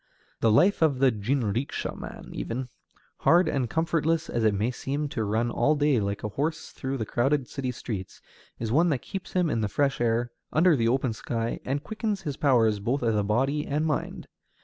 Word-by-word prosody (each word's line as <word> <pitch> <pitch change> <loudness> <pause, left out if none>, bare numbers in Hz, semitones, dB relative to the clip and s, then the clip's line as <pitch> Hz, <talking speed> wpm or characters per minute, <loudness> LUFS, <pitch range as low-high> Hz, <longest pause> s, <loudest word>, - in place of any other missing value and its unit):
The 115 - +3
life 180 - +4
of 155 -5 +3
the 130 0 +4
jinrikisha 115 +2 -1
man - - -9
even, 125 +2 -4 0.5
hard 175 +2 +4
and 130 -4 0
comfortless 165 +1 0
as 120 - 0
it 110 -2 +3
may 110 +5 0
seem 140 +4 -3
to 115 - -2
run 110 +3 0
all 145 +7 +2
day 145 -4 +3
like 100 -1 -2
a 105 - -2
horse 150 +9 -3
through 135 0 -4
the 110 - -2
crowded 135 +4 +1
city 135 -2 -4
streets, 105 -6 -6 0.4
is 115 -1 -3
one 165 +7 +4
that 140 -6 -1
keeps 195 -2 -7
him 180 -2 +2
in 115 -7 0
the 105 - 0
fresh 135 +3 0
air, 120 +1 +1 0.2
under 165 +1 +4
the 115 -4 +1
open 130 0 +1
sky, 115 +1 -3
and 140 +2 -2
quickens 215 -3 -3
his 145 -3 -3
powers 115 -8 +3
both 125 +7 -1
of 105 -3 +1
body 135 +7 +1
and 150 +2 0
mind. 155 -2 -2
130 Hz, 195 wpm, -27 LUFS, 115-150 Hz, 0.5 s, life